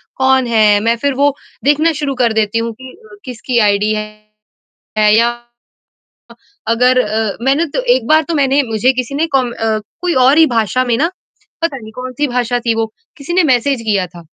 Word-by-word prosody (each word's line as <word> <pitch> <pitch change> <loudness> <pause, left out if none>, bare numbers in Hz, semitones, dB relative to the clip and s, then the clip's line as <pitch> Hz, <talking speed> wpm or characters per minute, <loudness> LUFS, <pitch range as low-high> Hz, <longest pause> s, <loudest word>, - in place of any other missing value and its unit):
कौन 265 -1 +2
है? 215 -3 +3
मैं 230 +3 +1
फिर 280 - +1
वो 285 -1 +3 0.3
देखना 300 +4 +3
शुरू 275 -2 -2
कर 230 -2 +2
देती 215 +2 -1
हूँ 230 0 -3
कि 260 - -10 0.2
अ, - - -12
किसकी 250 0 -2
आइडी 210 +2 +1
है 215 0 -11 0.6
या 235 +1 +3 1.0
अ, - - -12 0.4
अगर 250 +2 +3
अ, 215 -2 -1
मैंने 280 +5 +2
तो - - +1
एक - - -3
बार 310 +1 +4
तो 335 - -2
मैंने 280 0 +2
मुझे 230 +4 +2
किसी 255 +2 -4
ने 315 - +1
कॉम 250 -2 -1
अ, 220 -2 -1 0.2
कोई 355 -1 0
और 285 +4 +4
ही 325 - +7
भाषा 225 +3 +1
में 235 -2 0
ना, 330 +7 0 0.5
पता 315 -5 -1
नहीं 220 -2 -11
कौन-सी 255 +3 -3
भाषा 245 0 -1
थी 235 -1 0
वो, 225 -1 -2 0.3
किसी 290 +5 -6
ने 365 -1 +3
मैसेज 250 0 0
किया 195 -3 +1
था 170 -1 -14
245 Hz, 195 wpm, -15 LUFS, 220-275 Hz, 1.0 s, ही